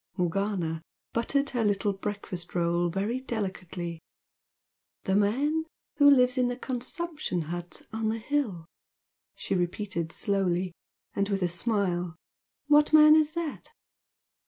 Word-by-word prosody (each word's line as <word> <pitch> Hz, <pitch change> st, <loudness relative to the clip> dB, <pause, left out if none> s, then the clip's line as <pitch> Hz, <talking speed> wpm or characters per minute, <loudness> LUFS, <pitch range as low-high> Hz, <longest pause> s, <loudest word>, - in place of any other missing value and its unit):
Morgana 180 Hz, -2 st, -1 dB, 0.3 s
buttered 275 Hz, +5 st, 0 dB
her 245 Hz, -3 st, 0 dB
little 205 Hz, 0 st, +1 dB
breakfast 195 Hz, -3 st, -5 dB
roll 170 Hz, 0 st, +1 dB
very 200 Hz, +8 st, -1 dB
delicately. 185 Hz, -8 st, -4 dB, 1.0 s
"The 190 Hz, -, +1 dB
man 275 Hz, +11 st, +2 dB, 0.3 s
who 285 Hz, -1 st, +7 dB
lives 250 Hz, -1 st, +5 dB
in 250 Hz, -, +3 dB
the 245 Hz, 0 st, -2 dB
consumption 270 Hz, -, -3 dB
hut 175 Hz, +2 st, -6 dB
on 220 Hz, 0 st, -1 dB
the 225 Hz, -, -1 dB
hill!" 225 Hz, -, -2 dB, 0.7 s
she -, -, -3 dB
repeated, 175 Hz, -2 st, -2 dB
slowly, 185 Hz, -2 st, 0 dB, 0.4 s
and 200 Hz, 0 st, 0 dB
with 195 Hz, -2 st, 0 dB
a -, -, +3 dB
smile 180 Hz, -2 st, 0 dB, 0.5 s
"What 295 Hz, +1 st, +4 dB
man 305 Hz, 0 st, +9 dB
is 310 Hz, -1 st, +3 dB
that?" 335 Hz, -3 st, -4 dB
205 Hz, 125 wpm, -28 LUFS, 175-255 Hz, 1.0 s, man